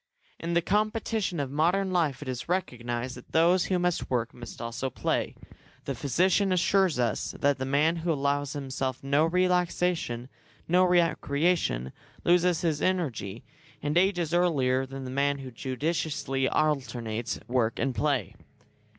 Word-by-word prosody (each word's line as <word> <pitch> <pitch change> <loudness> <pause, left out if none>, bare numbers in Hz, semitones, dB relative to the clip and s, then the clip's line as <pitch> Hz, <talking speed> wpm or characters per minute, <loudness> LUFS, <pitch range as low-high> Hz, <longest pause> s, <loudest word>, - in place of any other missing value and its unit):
In 170 +1 -2
the 170 - +3
competition 215 -2 0
of 140 -2 -2
modern 180 +6 +1
life 150 -6 +1
it - - -11
is 125 +3 -5
recognised 125 -8 -2
that 125 - -14
those 175 +3 +4
who 185 - +1
must 180 -1 -1
work 120 -2 -1
must 120 -2 -10
also 115 +3 -3
play. - - -1 0.5
The 140 - -2
physician 185 - +2
assures 185 -2 +3
us 120 -3 -1
that 140 -1 +2
the 130 - -2
man 150 +5 +2
who 165 +1 -1
allows 145 -1 0
himself 135 -2 -3
no 140 +3 +3
relaxation, 180 -7 0 0.4
no 180 +2 +4
recreation, 165 - +1 0.3
loses 175 -1 +3
his 160 -4 0
energy, 130 - -1 0.4
and 145 +1 -1
ages 175 -3 +2
earlier 135 -7 +2
than 135 0 -7
the 130 - -6
man 140 +1 +1
who 135 -2 -8
judiciously 135 +1 -1
alternates 120 -7 -1
work 120 -2 +1
and 135 -1 0
play. 145 -1 0
145 Hz, 145 wpm, -28 LUFS, 130-175 Hz, 0.5 s, those